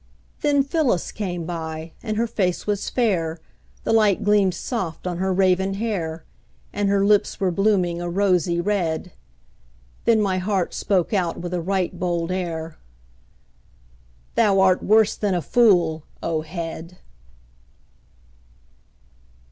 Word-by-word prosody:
Then 285 -2 +2
Phyllis 275 - 0
came 180 -5 -4
by, 160 -1 -5
and 215 -2 -3
her 230 - +2
face 185 -6 -1
was 205 -1 -1
fair, 175 -9 0 0.4
The - - 0
light 215 -4 +3
gleamed 205 -3 +3
soft 185 -11 -4
on 180 -1 -2
her 190 0 0
raven 190 +1 +2
hair; 175 -7 -3 0.5
And 205 -1 0
her 200 0 +2
lips 205 0 +2
were 190 -3 +1
blooming 185 -3 +1
a 175 - -3
rosy 180 -2 +1
red. 180 -3 -1 0.9
Then 230 -2 +4
my 190 -3 +1
heart 190 -1 -1
spoke 190 0 0
out 180 -4 0
with 175 +1 -5
a 175 - -1
right 185 0 -1
bold 175 -1 -1
air: 165 -3 -4 1.5
"Thou 205 -4 +3
art 190 -1 +4
worse 215 0 +4
than 200 -3 0
a - - +1
fool, 175 -9 +3 0.2
O 160 -2 -1
head!" 165 +1 -7
185 Hz, 130 wpm, -23 LUFS, 170-205 Hz, 1.5 s, Then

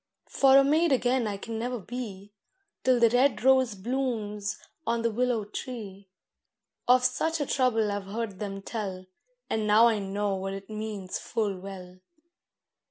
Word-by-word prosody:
For 270 -1 +5
a 275 - +7
maid 310 +4 +3
again 250 -2 +2
I 205 -1 -3
can 225 +2 -5
never 245 +2 -2
be, 205 -2 -7 0.5
Till 255 -1 +4
the 230 -1 +5
red 255 +2 +3
rose 260 -4 +4
blooms 210 -2 -2 0.3
on 230 0 0
the 230 - +1
willow 240 -1 0
tree. 205 -4 -7 0.8
Of 250 0 +5
such 320 +6 0
a 290 - 0
trouble 235 -6 +1
I've 200 -1 -4
heard 205 -2 -4
them 195 -1 -5
tell, 195 -5 -5 0.4
And 220 -1 -1
now 215 +2 +6
I 225 -3 +3
know 200 +1 -2
what 195 0 -3
it 195 +2 -9
means 210 -3 -4
full 210 -3 -2
well. 185 -1 -9
220 Hz, 160 wpm, -28 LUFS, 200-250 Hz, 0.8 s, a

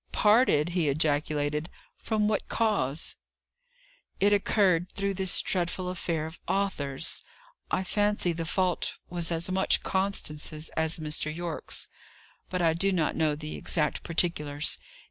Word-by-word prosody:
"Parted!" 210 - +4
he 170 -4 +1
ejaculated. 150 +1 0 0.3
"From 215 -2 0
what 210 -1 -1
cause?" 195 - 0 1.1
"It 205 +1 +4
occurred 190 -4 +3
through 200 0 -1
this 190 -1 +3
dreadful 180 0 -1
affair 170 -3 -2
of 160 +2 -9
Arthur's. 165 -8 -1 0.5
I 185 - +1
fancy 205 -1 +1
the 165 0 -3
fault 180 +1 0
was 175 -1 0
as 170 +2 0
much 190 +1 +3
Constance's 160 -5 -2
as 160 +2 0
Mr. 155 -1 -1
Yorke's, 170 0 -5 0.6
but 180 -1 -1
I 165 -1 +4
do 195 +4 +3
not 170 -5 +1
know 155 -2 +2
the 150 +1 -6
exact 150 -4 -1
particulars. 150 -4 0
170 Hz, 130 wpm, -28 LUFS, 155-190 Hz, 1.1 s, Parted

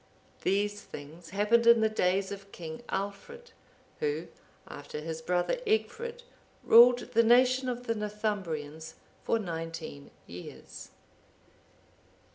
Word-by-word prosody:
(769) - - -28
These 205 +1 0
things 155 +4 -11
happened 210 +5 +2
in 235 -1 +7
the 220 - +4
days 190 -2 0
of 200 0 -8
King 160 -2 -7
Aldfrid,(770) 475 - -5 0.5
who, 445 -1 -2 0.4
after - - -8
his 160 +1 -5
brother 180 - 0
Egfrid, 470 +2 -1 0.4
ruled 245 +1 +6
the 230 - +6
nation 255 +2 +4
of 245 0 -4
the 230 - 0
Northumbrians 190 -8 -4 0.3
for - - +1
nineteen 165 -6 -6 0.2
years. 90 +1 -10
205 Hz, 115 wpm, -30 LUFS, 165-240 Hz, 0.5 s, in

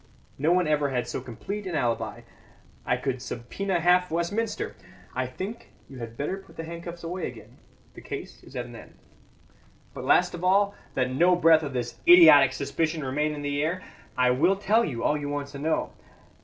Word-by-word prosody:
No 155 +4 +2
one 180 0 +3
ever 150 -2 +1
had 125 -2 -2
so - - -4
complete 195 - -6
an 175 - -3
alibi; 120 -5 -1 0.7
I - - +2
could 130 -2 -3
subpoena 130 +10 -3
half 180 +1 +4
Westminster. 200 +7 -2 0.4
I 130 0 -1
think 195 - -7 0.2
you 135 -2 -11
had 115 -1 -8
better 150 +7 -2
put 195 0 -16
the 165 - -4
handcuffs 170 +1 -8
away 175 +2 -3
again. 115 -4 -12 0.3
The - - -12
case - - -7
is 135 - -15
at 125 -1 -3
an 120 -1 -11
end. - - -13 1.0
"But - - -7
last - - +3
of 175 0 -7
all, 200 +2 +3 0.2
that 130 -1 0
no 175 +7 +4
breath 165 -2 +5
of 145 -3 -5
this 120 -1 -3
idiotic 155 -7 +9
suspicion 155 +3 -2
remain 150 +3 -1
in 145 - -6
the 145 0 -1
air, 170 +5 -1 0.3
I 125 0 +4
will 165 +10 +3
tell 210 +4 +2
you 125 - -3
all 150 - +2
you 145 0 -4
want 145 -1 -3
to 140 -1 -9
know. 160 +2 -1
155 Hz, 195 wpm, -26 LUFS, 130-180 Hz, 1.0 s, idiotic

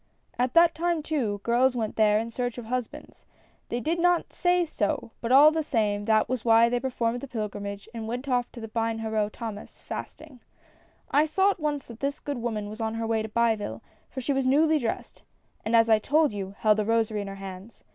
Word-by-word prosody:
"At 250 +3 0
that 335 0 +6
time, 335 -1 -1
too, 235 -11 -2
girls 250 +2 +3
went 220 -3 -2
there 210 -1 +4
in 225 +2 -3
search 245 0 -3
of 240 - -6
husbands. 250 0 -6 0.4
They 240 - -2
did 325 +6 -1
not 355 0 +2
say 355 -1 +2
so, 220 -6 -2
but 235 - -2
all 290 +4 +8
the 320 0 0
same 210 -8 0
that 220 -1 +3
was 250 -2 -2
why 230 0 +5
they 245 0 0
performed 245 -2 -2
the 275 - -7
pilgrimage, 205 -4 -5
and 225 -1 -5
went 250 +4 -4
off 245 -2 0
to 230 -2 -7
Bienheureux 225 -1 -1
Thomas^ 215 -1 -8
fasting. 305 -5 -8 0.7
I 295 +2 +4
saw 385 +6 +3
at 395 - -7
once 295 -3 -2
that 235 -1 -12
this 280 +1 -2
good 285 -4 -4
woman 220 -3 -3
was 215 +2 -8
on 220 0 -2
her 225 0 -2
way 225 -1 0
to 220 - -5
Biville, 215 - 0 0.3
for 260 - -6
she 280 +3 0
was 270 -1 0
newly 310 +3 +4
dressed, 230 -4 -4 0.4
and 225 +2 +1
as 225 0 +5
I 220 -1 +5
told 295 +2 +2
you, 195 -1 -5
held 215 -1 +3
a - - +2
rosary 220 -1 0
in 200 - -6
her 195 - -6
hands. 195 +2 -10
235 Hz, 215 wpm, -26 LUFS, 215-275 Hz, 0.7 s, all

